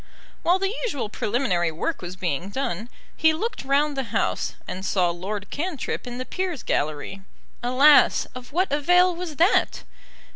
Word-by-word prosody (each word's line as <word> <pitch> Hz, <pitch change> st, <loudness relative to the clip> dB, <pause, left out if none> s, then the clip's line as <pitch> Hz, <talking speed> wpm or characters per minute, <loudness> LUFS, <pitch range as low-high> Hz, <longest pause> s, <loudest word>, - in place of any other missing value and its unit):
While 355 Hz, +2 st, +3 dB
the 390 Hz, +2 st, -1 dB
usual 285 Hz, -, -2 dB
preliminary 205 Hz, -7 st, 0 dB
work 225 Hz, -, -3 dB
was 180 Hz, 0 st, -6 dB
being 180 Hz, -1 st, -2 dB
done, 235 Hz, -2 st, -3 dB, 0.3 s
he 320 Hz, -1 st, +4 dB
looked 435 Hz, -, -3 dB
round 285 Hz, +2 st, +2 dB
the 270 Hz, -1 st, -2 dB
House, 225 Hz, -, -1 dB
and 185 Hz, -, -5 dB
saw 180 Hz, -3 st, +2 dB
Lord 200 Hz, +4 st, -5 dB
Cantrip 305 Hz, -5 st, -3 dB
in 245 Hz, 0 st, -6 dB
the 255 Hz, -, -4 dB
Peers' 365 Hz, -, -3 dB
gallery. 155 Hz, +6 st, -2 dB, 0.4 s
Alas! 265 Hz, +5 st, +5 dB
of 255 Hz, -1 st, -10 dB
what 360 Hz, +3 st, +1 dB
avail 355 Hz, +5 st, +4 dB
was 340 Hz, -3 st, -5 dB
that? 345 Hz, +8 st, +2 dB
265 Hz, 155 wpm, -24 LUFS, -, 0.4 s, Alas